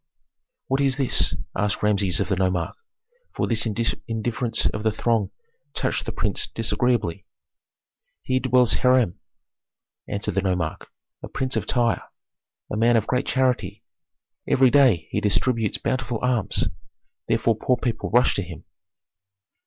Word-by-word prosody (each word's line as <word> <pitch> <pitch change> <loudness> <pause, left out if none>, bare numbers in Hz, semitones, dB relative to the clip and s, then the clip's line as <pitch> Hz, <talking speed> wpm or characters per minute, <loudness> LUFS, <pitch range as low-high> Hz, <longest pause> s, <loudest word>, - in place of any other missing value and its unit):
"What 135 +1 +1
is 135 -2 +2
this?" 135 -3 +2 0.2
asked 105 +1 -1
Rameses 100 -2 +1
of 100 - 0
the 95 - +1
nomarch, 95 -2 -1 0.6
for - - 0
this 115 0 +1
indifference 115 +2 -2
of 105 - 0
the 110 0 +1
throng 115 0 0 0.5
touched - - -1
the - - -1
prince - - -1
disagreeably. 120 -9 -1 1.0
"Here 130 0 +1
dwells 125 -2 +3
Hiram," 125 -8 +2 0.9
answered 100 0 -3
the 95 - +1
nomarch, 90 -4 -2 0.3
"a - - -7
prince 130 -1 -3
of - - -2
Tyre, 120 -2 +1 0.7
a - - -1
man 115 +1 +4
of 110 - 0
great 125 +1 -1
charity. 125 -7 0 0.6
Every 130 -1 +4
day 120 - +4
he - - -1
distributes 105 +2 +1
bountiful 125 -3 -2
alms, 125 -5 +1 0.6
therefore 115 0 +2
poor 125 +2 +1
people 120 -1 -2
rush 125 +2 +4
to - - +1
him." 85 -5 -9
115 Hz, 135 wpm, -24 LUFS, 100-125 Hz, 1.0 s, man